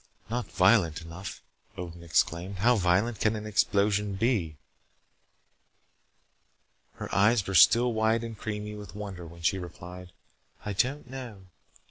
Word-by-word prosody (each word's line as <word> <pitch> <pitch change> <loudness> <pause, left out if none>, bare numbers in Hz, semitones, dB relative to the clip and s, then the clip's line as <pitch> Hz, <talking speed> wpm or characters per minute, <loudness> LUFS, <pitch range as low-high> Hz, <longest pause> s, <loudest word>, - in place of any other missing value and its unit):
"Not 120 -3 -3
violent 90 -5 +3
enough," 85 +3 -8 0.3
Odin 85 -1 -7
exclaimed. 85 +3 0
"How 120 +6 +4
violent 100 +3 +1
can 110 0 +2
an 105 0 -5
explosion 100 -1 +1
be?" 95 - 0 2.4
Her - - -7
eyes 105 +1 +4
were 95 - -4
still 120 +8 +6
wide 110 +1 +1
and 115 -1 -6
creamy 105 0 -5
with 105 -1 -10
wonder 95 -5 -7
when 85 +1 -13
she 95 +3 +2
replied. 90 +1 -9 0.5
"I 105 - -2
don't 130 +7 0
know. 125 -7 -8
100 Hz, 130 wpm, -28 LUFS, 90-110 Hz, 2.4 s, still